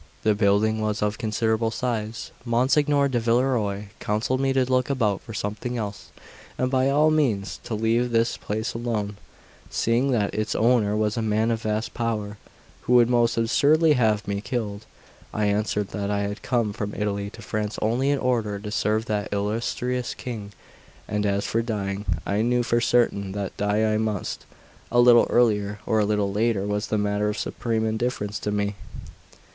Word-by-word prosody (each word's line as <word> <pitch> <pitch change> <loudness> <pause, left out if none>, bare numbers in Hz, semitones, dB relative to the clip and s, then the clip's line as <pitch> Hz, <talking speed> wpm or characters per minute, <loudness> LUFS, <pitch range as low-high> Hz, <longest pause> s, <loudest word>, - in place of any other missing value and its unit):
The 110 - +4
building 105 +1 +2
was 105 -1 -1
of 105 0 -1
considerable 110 0 0
size. 115 -2 -3
Monsignor 140 +4 +2
di 130 -3 0
Villerois 115 -4 0
counselled 110 +5 -1
me 135 0 +1
to 130 -1 +2
look 130 +1 +1
about 110 -8 +1
for - - -10
something 105 +5 -3
else, 105 -3 -5 0.5
and 130 0 0
by 130 0 +3
all 150 +3 +4
means 110 - 0
to 110 - -3
leave 115 +3 +1
this 115 0 +1
place 110 +2 -3
alone, 110 -4 -3 0.5
seeing 120 +4 +1
that 110 -6 +1
its 110 0 -1
owner 110 -3 +3
was 105 +1 0
a - - 0
man 110 +1 +1
of 115 -1 -1
vast 110 +1 -2
power, 105 -3 -3 0.4
who 125 - 0
would 120 -1 +6
most 120 -1 +2
assuredly 150 +7 +4
have 110 -6 +1
me 100 0 -2
killed. 105 -1 -4 0.5
I 105 - +1
answered 105 0 0
that 100 -1 -3
I 100 0 0
had 100 +1 -4
come 120 -5 0
from 105 0 -4
Italy 100 -1 -2
to - - -12
France 105 0 -3
only 120 +6 +1
in 145 - +2
order 115 -6 0
to 105 +1 -7
serve 110 +1 0
that 105 -2 -2
illustrious 115 +4 -2
King; 110 -5 -6 0.6
and 105 0 0
as 100 0 0
for 115 - 0
dying, 100 -3 -3 0.2
I 100 +2 0
knew 120 +1 +2
for 120 0 +1
certain 100 -5 +1
that 100 -2 -4
die 105 +1 +1
I - - +2
must; 110 -3 -3 0.4
a 120 - +3
little 120 -1 +7
earlier 105 -4 +2
or 110 - +2
a 105 - +3
little 105 -1 0
later 105 -2 +1
was 105 +1 -2
a 110 - +2
matter 105 0 0
of 105 - -3
supreme 115 -2 -2
indifference 110 -2 -2
to 105 - -2
me. 105 0 0
110 Hz, 180 wpm, -24 LUFS, 105-120 Hz, 0.6 s, little